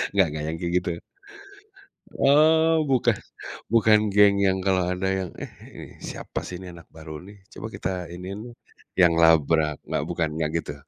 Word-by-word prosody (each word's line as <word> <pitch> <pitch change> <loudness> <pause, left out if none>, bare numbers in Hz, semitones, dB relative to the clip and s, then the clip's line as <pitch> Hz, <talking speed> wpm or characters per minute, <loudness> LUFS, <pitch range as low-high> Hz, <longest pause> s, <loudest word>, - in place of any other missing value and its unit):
Enggak 95 -3 +4
enggak 75 -1 -4
yang 80 - -3
kayak 85 +1 -3
gitu? 90 - -3 1.3
Oh 160 +3 +4
bukan 130 -3 +3 0.6
bukan 110 -2 +5 0.2
geng 100 -1 +6
yang 95 0 +1
kalau 95 -1 +2
ada 95 +1 -2
yang, 95 -2 -4
"Eh, - - -7 0.2
ini - - -9 0.2
siapa - - -6
sih 90 - -6
ini - - -9
anak 85 -3 -13
baru 80 -1 -9
nih, 100 - -13 0.2
coba - - -7
kita - - -3 0.3
iniin 95 +3 -7
dong." 120 -1 -12 0.4
Yang 85 -2 +6
labrak, 80 -2 +4
enggak? - - -2
Bukan? 85 -2 0
Enggak 80 -1 -1
gitu? 70 - -7
90 Hz, 170 wpm, -24 LUFS, 80-105 Hz, 1.3 s, geng